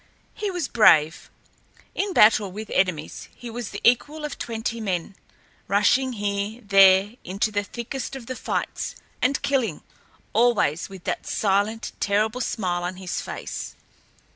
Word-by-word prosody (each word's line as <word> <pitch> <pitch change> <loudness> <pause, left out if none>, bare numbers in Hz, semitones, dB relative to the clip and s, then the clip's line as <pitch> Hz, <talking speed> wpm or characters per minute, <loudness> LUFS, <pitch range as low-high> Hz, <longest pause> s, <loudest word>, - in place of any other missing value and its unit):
He 420 -1 -3
was 355 -6 -2
brave. 160 -8 +4 0.6
In 400 0 -1
battle 210 - +5
with 215 +3 -7
enemies 180 -5 -1
he 240 -1 -8
was 235 -2 -5
the - - -6
equal 295 +6 +2
of 295 - -6
twenty 230 0 -3
men, 190 -2 -3 0.5
rushing 250 +6 +3
here, 205 +1 -2
there, 195 +2 +5
into 200 +5 -1
the 205 0 0
thickest 240 +5 -6
of 260 -3 -8
the 255 - -5
fights, - - -3 0.3
and 280 - +2
killing 245 - 0 0.5
always 210 -9 +2
with 190 -2 -11
that - - -3
silent, 205 +2 0
terrible 215 +4 +1
smile 180 -6 -1
on 180 +1 -3
his 185 -1 -4
face. - - -6
215 Hz, 140 wpm, -24 LUFS, 195-240 Hz, 0.6 s, battle